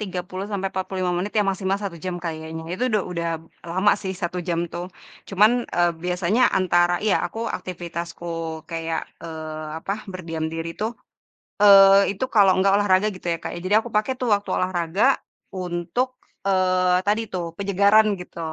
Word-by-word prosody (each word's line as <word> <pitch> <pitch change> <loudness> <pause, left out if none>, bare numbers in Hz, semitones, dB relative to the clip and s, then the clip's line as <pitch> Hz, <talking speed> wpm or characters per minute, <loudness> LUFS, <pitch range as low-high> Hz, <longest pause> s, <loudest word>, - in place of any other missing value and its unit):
30 185 -1 -4
sampai 195 -1 -1
45 185 -1 -2
menit 200 +3 -3
ya 205 - +3
maksimal 195 0 0
1 200 -4 -5
jam 180 -1 -2
kayaknya. 160 0 -5
Itu 250 +4 -1
udah 210 -3 +2
udah 170 -1 -2 0.4
lama 190 +4 +3
sih 190 - -3
1 175 +1 -2
jam 170 0 0
tuh. 180 +2 -5 0.4
Cuman 205 +3 +5 0.2
e 175 - -1 0.2
biasanya 180 +7 +1 0.2
antara, 175 -1 +3
iya 210 - +3
aku 225 - -9
aktivitasku 175 -1 -6 0.4
kayak, 165 -1 -2 0.2
eee, 155 -1 -6
apa 195 - -3 0.2
berdiam 165 -3 -4
diri 165 0 -4
tuh, 220 +2 0 0.7
eee 195 -1 +8
itu 205 - -2
kalau 200 -3 +5
enggak 195 +1 +3
olahraga 205 0 +3
gitu 185 - -14
ya, - - -3
Kak. - - -5
Jadi 185 +4 -2
aku 240 - -7
pakai 215 +5 +2
tuh 250 -3 -1
waktu 200 0 -1
olahraga 185 +7 +2 0.4
untuk 180 +7 -2 0.4
eee 185 -1 +3
tadi 210 +3 +1
tuh, 175 -2 -2
penyegaran 200 +2 +4 0.2
gitu. 175 - -11
185 Hz, 160 wpm, -23 LUFS, 175-200 Hz, 0.7 s, eee